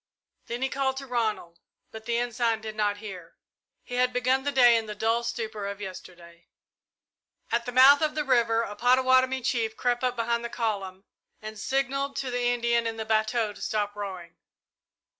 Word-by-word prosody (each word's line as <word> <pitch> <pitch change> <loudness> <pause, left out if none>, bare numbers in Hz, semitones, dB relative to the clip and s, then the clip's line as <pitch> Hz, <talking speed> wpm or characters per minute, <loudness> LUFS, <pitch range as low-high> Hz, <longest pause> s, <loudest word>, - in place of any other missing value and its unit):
Then 240 +2 -4
he 265 - +1
called 265 -1 -1
to 275 - -6
Ronald, 220 -9 -2 0.3
but 220 0 -10
the 235 0 0
Ensign 235 -1 0
did 220 -1 -7
not 205 -1 0
hear. 180 -4 -9 0.5
He 245 - -11
had 250 0 +2
begun 255 +2 +1
the 285 +1 -2
day 245 -3 +6
in 225 -1 -1
the 210 - -6
dull 225 +2 0
stupor 220 -4 -4
of 200 0 -6
yesterday. 175 -3 -10 1.0
At 235 +1 0
the - - -2
mouth 265 +4 +7
of 305 -1 0
the 305 - 0
river 235 -4 +2
a 205 -2 -6
Pottawattomie 260 +2 +3
chief 225 -3 -1
crept 245 0 0
up 250 -1 0
behind 235 0 -1
the 235 - -4
column 195 -5 -3 0.4
and 215 0 -8
signalled 275 +3 -1
to 260 -2 -3
the 245 0 0
Indian 235 -1 +1
in 225 0 -4
the 220 - -4
bateau 220 0 0
to - - -14
stop 205 -1 -2
rowing. 185 -4 -7
235 Hz, 185 wpm, -27 LUFS, 215-250 Hz, 1.0 s, mouth